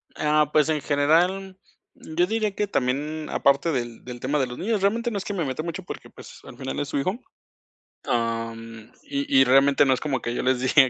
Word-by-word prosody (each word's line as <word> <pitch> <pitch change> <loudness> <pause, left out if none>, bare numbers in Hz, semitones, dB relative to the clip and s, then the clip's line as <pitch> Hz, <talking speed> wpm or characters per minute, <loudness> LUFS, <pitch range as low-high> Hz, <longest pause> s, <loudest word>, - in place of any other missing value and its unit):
Ah, 150 -1 +2
pues, 155 0 +3
en 155 -2 0
general, 175 +7 +1 0.4
yo 165 +3 -1
diría 215 -1 -1
que 210 - -1
también 150 +1 -1
aparte 140 +4 +2
del 120 -5 -4
del 125 -1 -8
tema 140 +4 0
de 130 - +1
los 125 0 -8
niños, 215 0 -1
realmente 230 +4 +1
no 210 - -2
es 195 - -5
que 205 - -3
me 175 -5 -1
meta 135 +3 -3
mucho, 170 +3 -5
porque - - -9
pues, - - -13
al - - -12
final 135 - -4
es 145 - -2
su - - -2
hijo. 185 - -1 0.9
Am, 115 -1 -3
y 140 -1 +1
y - - +8
realmente 135 +2 +5
no 135 - +4
es 125 - -1
como 135 -5 -2
que 120 - -3
yo - - -2
les 130 -1 +2
diga 130 +1 +5
145 Hz, 220 wpm, -24 LUFS, 130-175 Hz, 0.9 s, y